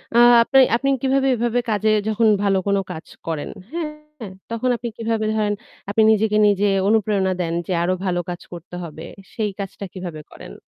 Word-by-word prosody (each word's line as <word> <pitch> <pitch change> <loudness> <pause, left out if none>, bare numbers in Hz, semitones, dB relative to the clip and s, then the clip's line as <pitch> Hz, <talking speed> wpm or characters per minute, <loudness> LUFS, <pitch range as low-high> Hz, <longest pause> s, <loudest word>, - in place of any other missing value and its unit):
আ - - +5 0.3
আপনি 270 +3 +4 0.2
আপনি 275 +3 0
কিভাবে 270 0 +2
এভাবে 240 +1 0
কাজে 215 0 +1 0.2
যখন 220 +1 +2 0.2
ভালো 195 -1 +2
কোনো 200 0 +2
কাজ 160 -2 -7 0.2
করেন, 160 -3 -3 0.2
হ্যাঁ 320 -3 -3 0.6
তখন 230 +2 -1
আপনি 235 +1 -5
কিভাবে 225 -1 -1
ধরেন, 210 -1 0 0.4
আপনি 220 +2 +2
নিজেকে 215 0 +2
নিজে 205 0 +2 0.2
অনুপ্রেরণা 205 -3 +2
দেন 165 -1 -2
যে 185 - -1
আরও 185 +2 +1
ভালো 180 -1 0
কাজ 175 0 -5
করতে 175 +1 -9
হবে, 160 -1 -8 0.3
সেই 215 -2 -1
কাজটা 195 0 -6
কিভাবে 175 -5 -7
করেন? - - -11
210 Hz, 175 wpm, -21 LUFS, 185-230 Hz, 0.6 s, আ